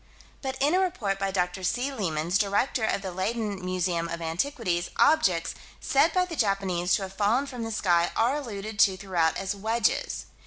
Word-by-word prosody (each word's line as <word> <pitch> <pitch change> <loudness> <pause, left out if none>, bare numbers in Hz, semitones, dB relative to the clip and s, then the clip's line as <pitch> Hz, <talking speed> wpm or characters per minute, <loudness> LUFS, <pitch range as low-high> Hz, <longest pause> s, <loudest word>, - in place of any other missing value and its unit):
But 265 -1 -4
in 290 +4 +2
a 370 - +4
report 240 - -1
by 195 0 0
Dr. 180 -1 -1
C. 250 +9 0
Leemans, 175 - -1
Director 215 +4 +1
of 205 -2 0
the 190 - -4
Leyden 200 +1 -2
Museum 180 -2 -1
of 170 - -4
Antiquities, 175 - -1
objects, 175 - +3 0.3
said 310 +2 +3
by 365 +2 +2
the 345 -2 -6
Japanese 195 - +1
to 200 - -2
have 190 0 -7
fallen 215 +7 +2
from 250 -4 -7
the 225 - -4
sky, 175 -5 +2
are 240 +5 +2
alluded 215 -6 -5
to 190 -2 +5
throughout 180 -4 0
as 195 +1 -2
"wedges." 220 +3 0
200 Hz, 185 wpm, -27 LUFS, 180-240 Hz, 0.3 s, to